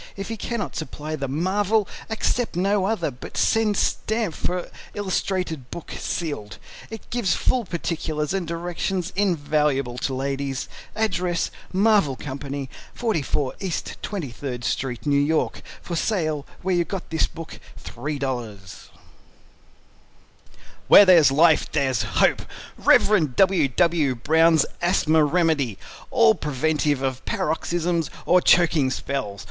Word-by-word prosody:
If 195 +1 -5
he 225 - -3
cannot 225 +1 -4
supply 155 0 -5
the 140 -2 -3
MARVEL, 195 +8 +1 0.2
accept 225 +1 -1
no 195 +2 +1
other, 185 -8 -1
but 125 - -10
send 220 -2 +2
stamp 220 -5 0
for 180 +2 -3 0.2
illustrated 185 -8 -2
book 170 - -8
sealed. 145 - -4 0.3
It 225 -1 -9
gives 235 -8 +1
full 250 -3 0
particulars 160 -3 -3
and 190 -3 -2
directions 175 +2 -3
invaluable 150 -9 0
to 130 - -2
ladies. 135 0 -3 0.3
Address 180 -6 0 0.2
MARVEL 195 -7 +3
CO. 140 0 -5 0.3
44 150 - -1
East 190 -4 -4
23d 135 - -5
Street, 125 0 -2
New 140 -1 +3
York 155 +2 0 0.2
For 175 - -4
Sale 155 -6 -1 0.2
where 190 0 +1
you 175 -1 +3
got 190 0 -6
this 160 - +2
book. 165 0 -10 0.2
$3.00 125 -10 -5 2.0
"WHERE 205 - +9
THERE'S 170 -7 +7
LIFE, 160 +3 +4
THERE'S 135 -6 +1
HOPE" - - +2 0.3
Rev. 165 -11 +3
W. 185 -6 +4
W. 155 -1 +1
Brown's 160 +4 +4 0.2
Asthma 160 -3 +3
Remedy 150 - +1 0.3
A 230 -2 +5
Preventive 150 -3 0
of 130 -1 -2
Paroxysms 170 0 -1 0.2
or 180 +1 +5
Choking 165 -7 +4
Spells. 130 -7 -3
160 Hz, 120 wpm, -23 LUFS, 140-185 Hz, 2.0 s, WHERE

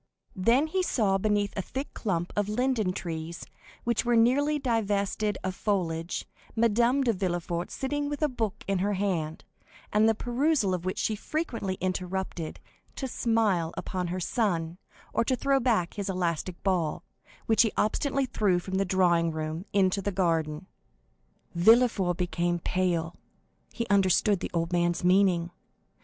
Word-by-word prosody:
Then 230 +9 +3
he 370 +4 0
saw 205 - +1
beneath 205 0 +1
a 195 - -1
thick 265 +9 -6
clump 175 -5 -2
of 205 0 0
linden 230 -3 +1
trees, 170 -2 -5 0.4
which 235 0 +1
were 240 -1 +2
nearly 275 +6 +3
divested 210 -5 0
of 190 0 -2
foliage, 175 -5 -2 0.3
Madame 235 +4 +3
de 235 -3 +2
Villefort 175 -2 -2
sitting 285 +2 -2
with 290 +1 -3
a - - +5
book 220 -6 -3
in 195 -1 +1
her 205 +2 +1
hand, 180 -6 -2 0.5
the 220 +1 +4
perusal 245 -3 +1
of 180 -1 -3
which 185 - -2
she 220 - 0
frequently 230 - -3
interrupted 185 -2 -3 0.4
to 265 - -3
smile 215 -9 +1
upon 180 -2 -3
her 180 +2 -3
son, 175 -5 -1 0.3
or 230 - +2
to 255 - +1
throw 275 +1 +2
back 225 -9 +1
his 200 -1 -4
elastic 175 -1 -2
ball, 175 -6 0 0.4
which 220 - +4
he 225 -2 +3
obstinately 275 +5 +1
threw 205 -7 +1
from 190 +2 -2
the 195 - +2
drawing 175 -3 +3
room 155 +3 -4
into 195 0 +2
the 205 - -2
garden. 165 -3 0 0.9
Villefort 195 -1 +4
became 175 -1 0
pale; 175 -1 -1 0.6
he 235 - -3
understood 195 0 +3
the - - -4
old 165 +1 -1
man's 175 0 +1
meaning. 180 -2 +3
195 Hz, 150 wpm, -28 LUFS, 175-230 Hz, 0.9 s, a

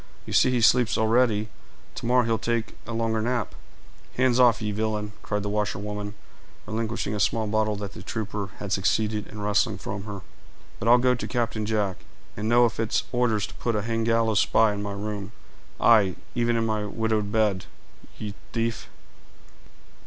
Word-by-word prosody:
You - - -6
see - - +5
he 125 -2 +1
sleeps 120 -1 +4
already; 110 -1 +2 0.5
to - - -5
morrow 125 +1 +4
he'll 115 -2 +1
take 115 0 -2
a - - -5
longer 115 -1 0
nap." 120 -1 -1 0.6
"Hands 130 -1 +3
off, 120 -4 +6
ye 105 -1 -2
villain," 105 0 -2
cried 105 -1 -2
the 105 - -2
washerwoman, 105 0 -3 0.5
relinquishing 110 0 -2
a 105 - -2
small 110 +2 +1
bottle 110 0 +1
that 100 0 -6
the - - -9
trooper 105 -2 -4
had 100 -2 -6
succeeded 105 +2 +1
in 105 - -9
wresting 105 +1 +1
from 100 0 -6
her. 100 -2 -6 0.6
"But 115 - -3
I'll 120 +1 +8
go 125 +1 +3
to 125 - -4
Captain 115 -3 -1
Jack, 105 -4 0 0.4
and 105 +1 -2
know 120 +1 +6
if 115 - -2
it's 115 -1 +1
orders 120 -4 +1
to - - -11
put 115 -2 -2
a 105 - -1
hang 115 0 -1
gallows 115 -2 +2
spy 110 -2 +4
in 100 - -4
my 100 0 -4
room; 100 0 -5 0.5
aye, 105 -6 +5 0.2
even 120 -1 +1
in 115 0 +1
my 110 -1 0
widowed 110 -1 -1
bed, 105 -4 +1 0.5
you 105 -2 -5 0.2
tief!" 115 0 -2
110 Hz, 180 wpm, -26 LUFS, 105-115 Hz, 0.6 s, I'll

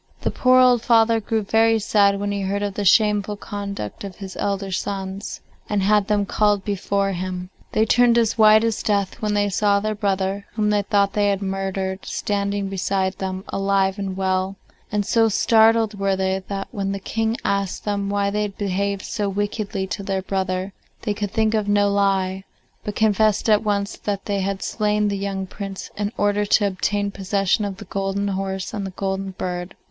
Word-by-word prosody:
The - - 0
poor 255 0 +4
old 250 -2 +5
father 230 -2 +4
grew 220 0 -1
very 225 +2 +3
sad 200 -2 +3
when 205 0 -2
he 200 0 -2
heard 200 +1 -1
of 200 -1 -2
the 205 - -3
shameful 210 +1 +3
conduct 200 - -6
of 195 -2 -7
his 195 -2 -8
elder 200 -1 -2
sons, 195 +1 -4 0.3
and 205 -2 +1
had 205 0 +3
them 205 -1 +1
called 205 -1 +1
before 200 0 0
him. 180 0 -4 0.2
They 220 - +3
turned 240 +1 +4
as 230 -2 +2
white 215 0 +6
as 225 -2 0
death 200 +2 -1
when 210 -1 0
they 205 0 +2
saw 200 +1 +2
their 215 +1 -1
brother, 200 -1 -1
whom 210 -1 +1
they 205 -1 +2
thought 200 0 +1
they 205 -1 +2
had 200 0 0
murdered, 190 0 -3
standing 200 -1 -2
beside 190 0 -1
them 190 0 -3
alive 195 0 +1
and 190 -1 -4
well, 190 0 0 0.4
and 210 -1 0
so 225 +1 +3
startled 220 0 +3
were 195 -1 +1
they 190 0 0
that 195 -1 -4
when 195 -1 -2
the 195 - -4
King 225 +3 -1
asked 200 -1 -1
them 200 -1 -1
why 200 0 0
they 210 +1 -1
had 205 -2 -4
behaved 200 0 -1
so 210 -3 -2
wickedly 205 0 -2
to 195 - -4
their 195 -1 -2
brother 190 0 -2 0.3
they 210 - 0
could 205 0 -3
think 220 +2 +1
of 215 -2 0
no 205 0 +3
lie, 195 -1 +1 0.4
but 210 - -4
confessed 215 -1 +2
at 215 -1 +4
once 200 -1 -1
that 200 -2 -3
they 200 -1 -1
had 195 0 -2
slain 210 -1 0
the 200 - -1
young 195 -1 -3
Prince 195 0 -7
in 205 0 -2
order 205 0 +2
to 205 0 +3
obtain 200 +1 -1
possession 195 +1 0
of 195 -2 -5
the - - -9
golden 195 +1 -2
horse 190 -1 -3
and 200 -2 -3
the 185 - -11
golden 195 0 -2
bird. 180 0 -4
200 Hz, 195 wpm, -22 LUFS, 195-210 Hz, 0.4 s, white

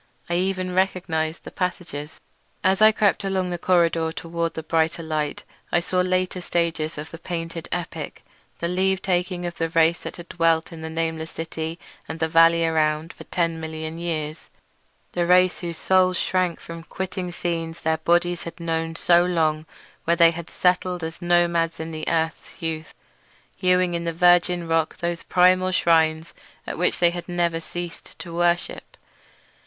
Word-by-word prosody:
I - - +2
even 185 0 0
recognised 175 -4 0
the - - -9
passages. 170 -5 -4 0.4
As 190 +2 +3
I 215 0 +8
crept 205 -2 +2
along 190 -2 -1
the 175 - -3
corridor 165 -2 +2
toward 165 0 -3
the 160 - -4
brighter 160 +1 0
light 155 -2 -2 0.3
I - - +4
saw 180 +2 0
later 185 0 0
stages 165 -3 -1
of 150 +1 -6
the 165 - -9
painted 165 -1 -5
epic—the 175 -1 -6
leave 190 +2 +1
taking 180 -1 0
of 175 0 -5
the 165 -1 0
race 165 +1 +3
that - - -7
had 175 0 -10
dwelt 165 -1 +1
in 160 - -9
the 160 - -5
nameless 160 0 -2
city 160 0 -5 0.3
and 160 - -6
the 160 - +1
valley 165 +1 +5
around 155 0 +1
for - - -12
ten 165 -2 -1
million 160 0 -5
years; 155 -2 -4 0.6
the 175 -1 0
race 180 0 +4
whose 170 -2 -5
souls 185 0 +3
shrank 180 -2 0
from 165 0 -8
quitting 185 +1 -5
scenes 165 -1 -3
their 160 0 +1
bodies 175 +1 +2
had 170 - -8
known 165 -1 -2
so 175 +1 +4
long, 160 -3 0 0.4
where 170 - +3
they 170 -1 +6
had 170 0 -7
settled 180 -1 +1
as 165 +2 -6
nomads 170 -1 +2
in 160 0 -5
the 155 -1 -5
earth's 160 -1 -1
youth, 160 -1 -4 0.6
hewing 180 -1 +2
in 170 0 -2
the 170 - 0
virgin 175 0 +4
rock 165 -1 +1
those 170 -1 -2
primal 185 +1 +4
shrines 160 -2 +2 0.3
at - - -5
which 180 - +2
they 175 0 +2
never 170 -2 0
ceased 175 -1 -8
to 165 0 -8
worship. 175 0 -1
170 Hz, 165 wpm, -24 LUFS, 160-180 Hz, 0.6 s, I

